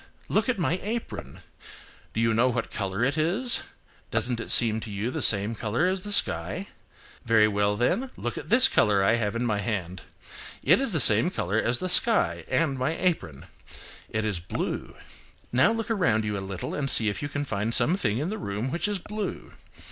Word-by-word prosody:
Look 220 +4 +1
at 250 - 0
my 175 0 0
apron. 225 +3 -6 0.7
Do 110 - -1
you 115 -1 +2
know 120 +3 +3
what 120 -2 -3
colour 95 +2 -3
it 140 +5 0
is? 200 +11 +2 0.5
Doesn't 115 +1 -1
it - - -5
seem 110 -2 +7
to 110 - -8
you 105 +4 -3
the - - -4
same 100 +2 +4
colour 115 +8 -1
as 185 0 -1
the 205 - -4
sky? 90 - +1 0.5
Very 110 -2 +4
well 105 0 0
then, 175 - 0
look 120 - -4
at - - -8
this 255 +4 +6
colour 100 -2 +2
I 115 +4 +3
have 105 -1 -2
in 120 +1 -1
my 105 -3 0
hand. 95 -4 -4 0.6
It - - +4
is - - +1
the - - +2
same - - +6
colour 100 +5 -2
as 120 +2 0
the 185 - -3
sky 225 +4 +1
and 140 -5 0
my 145 +6 -1
apron. 160 - -2 0.6
It 110 0 -2
is 105 -5 -2
blue. 85 - -5 0.6
Now 130 - +4
look 225 0 -3
around 115 - +1
you 105 -1 -2
a 100 - -4
little 95 -1 -6
and 140 -2 -2
see 110 -3 +3
if 105 - -2
you 145 - -4
can 145 0 -3
find 110 -2 -2
some 160 +8 +2
thing 110 - -1
in 155 +9 -2
the 220 - -5
room 105 - -4
which 170 +3 -1
is 205 -1 -2
blue. 210 +3 -6
115 Hz, 205 wpm, -26 LUFS, 105-175 Hz, 0.7 s, seem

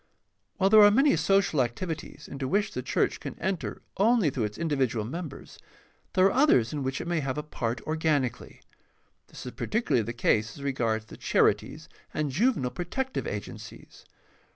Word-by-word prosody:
— - - -47
While 195 -1 +2
there 215 -1 +9
are 205 - +9
many 270 +5 +4
social 170 -2 +2
activities 155 +7 -4
into 135 -1 -4
which 200 +7 +1
the 125 - -4
church - - 0
can - - -7
enter 190 -1 -3
only 210 - +3
through 125 -4 -1
its 105 0 -6
individual 135 -9 0
members, 155 +3 -7 0.5
there 185 - +4
are 195 - +5
others 245 - +3
in 145 - -2
which 135 +1 -2
it - - -6
may 170 -1 0
have 135 -2 -3
a 150 - -2
part 120 -6 -3
organically. 155 -6 -1 0.7
This - - -11
is 125 - -5
particularly 220 - 0
the 115 +2 -4
case 110 -2 0
as 140 - -9
regards 115 -5 -1
the - - -12
charities - - +1 0.3
and 150 -2 -1
juvenile 155 - +1
protective 260 +10 -3
agen - - -5
cies. - - -13
150 Hz, 175 wpm, -27 LUFS, 125-195 Hz, 0.7 s, there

